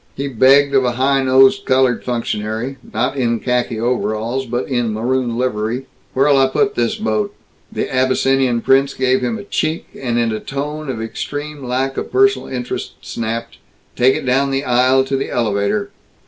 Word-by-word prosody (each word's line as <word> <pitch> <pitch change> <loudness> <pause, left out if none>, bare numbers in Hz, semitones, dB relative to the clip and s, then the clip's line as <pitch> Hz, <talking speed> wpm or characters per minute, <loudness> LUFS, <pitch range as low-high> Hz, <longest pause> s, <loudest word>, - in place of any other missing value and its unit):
He 140 +1 -3
begged 135 +3 +4
of 135 -1 +4
a 125 -1 0
high 135 +2 +2
nosed 135 +9 +4
colored 130 -2 +2
functionary 115 +1 -3
not 125 +5 -1
in 115 -3 0
khaki 125 -2 -1
overalls 115 +2 -1
but 120 +2 -2
in 120 -4 0
maroon 120 +2 -1
livery 125 +1 -1 0.3
"Where'll 135 +1 +4
I 135 - +5
put 200 +10 +1
this 120 -1 0
boat?" 110 -2 -2 0.4
The - - -2
Abyssinian 130 -1 +1
prince 135 +2 +3
gave 130 0 +1
him 120 -3 -1
a - - -8
check, 160 -5 -1
and 120 -3 -2
in 115 -1 +1
a 110 - -3
tone 145 +4 -5
of 115 -4 -3
extreme 145 +5 -5
lack 130 +2 -2
of - - -4
personal 400 +1 +3
interest 125 -1 -4
snapped, 115 0 -5 0.4
"Take 130 +2 +4
it - - -4
down 135 +2 +2
the 135 0 -1
aisle 130 +2 +3
to 135 +1 -2
the 135 - -2
elevator." 115 - -1
130 Hz, 175 wpm, -18 LUFS, 115-135 Hz, 0.4 s, I